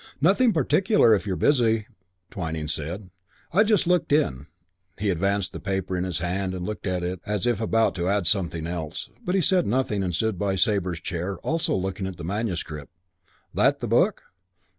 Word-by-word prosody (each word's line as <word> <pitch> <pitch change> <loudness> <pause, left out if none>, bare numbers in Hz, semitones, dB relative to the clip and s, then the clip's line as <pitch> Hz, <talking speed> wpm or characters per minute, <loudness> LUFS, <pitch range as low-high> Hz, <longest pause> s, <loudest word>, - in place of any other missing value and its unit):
"Nothing 200 - +4
particular, 160 - +4
if 105 0 0
you're 95 - 0
busy," 115 -5 +2 0.5
Twyning 80 -4 -4
said. 85 +6 -5 0.4
"I 195 - +5
just 210 -2 +3
looked 180 -3 +1
in." 75 - +1 0.5
He 100 0 0
advanced 100 +2 0
the - - -6
paper 95 -1 -2
in 90 0 -1
his 90 -2 -2
hand 95 +2 -2
and 90 -1 -4
looked 105 0 -5
at 90 -1 -1
it 90 0 -3
as 105 +1 -1
if 120 -3 +1
about 115 0 +2
to 85 +1 0
add 100 -2 +1
something 85 -3 0
else. 85 0 -4
But 180 - -1
he 190 - +3
said 180 +2 +3
nothing 110 -3 0
and 90 -3 -1
stood 110 0 -1
by 100 -2 0
Sabre's 90 -3 0
chair, 90 +3 -3
also 165 +1 0
looking 95 +1 -2
at 95 -2 -7
the 85 - -8
manuscript. 85 -6 -3 0.6
"That - - +3
that - - -3
book?" - - +2
95 Hz, 185 wpm, -25 LUFS, 90-115 Hz, 0.6 s, I